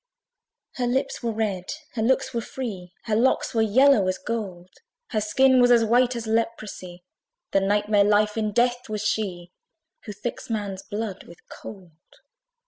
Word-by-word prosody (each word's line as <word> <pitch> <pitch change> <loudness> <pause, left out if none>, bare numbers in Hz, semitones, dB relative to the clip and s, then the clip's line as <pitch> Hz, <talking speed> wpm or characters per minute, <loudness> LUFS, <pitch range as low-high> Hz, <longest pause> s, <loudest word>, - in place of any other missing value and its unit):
Her 245 -1 0
lips 265 +3 -1
were 235 -2 -1
red, 210 -5 -2 0.3
her 225 - -2
looks 260 +2 +1
were 235 - -1
free, 205 -8 -6
Her 220 -2 -1
locks 245 +4 +2
were 225 - +2
yellow 220 -1 +4
as 185 0 0
gold: 185 -6 -5 0.4
Her 215 - 0
skin 260 +4 +4
was 245 - +5
as 235 -2 +5
white 245 +2 +3
as 230 -1 -4
leprosy, 215 -5 -3 0.5
The 195 - +3
Night 205 +2 +1
Mare 205 -1 +4
LIFE 210 +1 +2
IN 215 -2 -1
DEATH 245 +1 +1
was 215 -1 -3
she, 180 -5 -2 0.5
Who 215 - -6
thicks 210 +5 -6
man's 205 -4 -3
blood 205 -2 -5
with 170 - -14
cold. 190 -5 -11
215 Hz, 165 wpm, -24 LUFS, 200-240 Hz, 0.5 s, was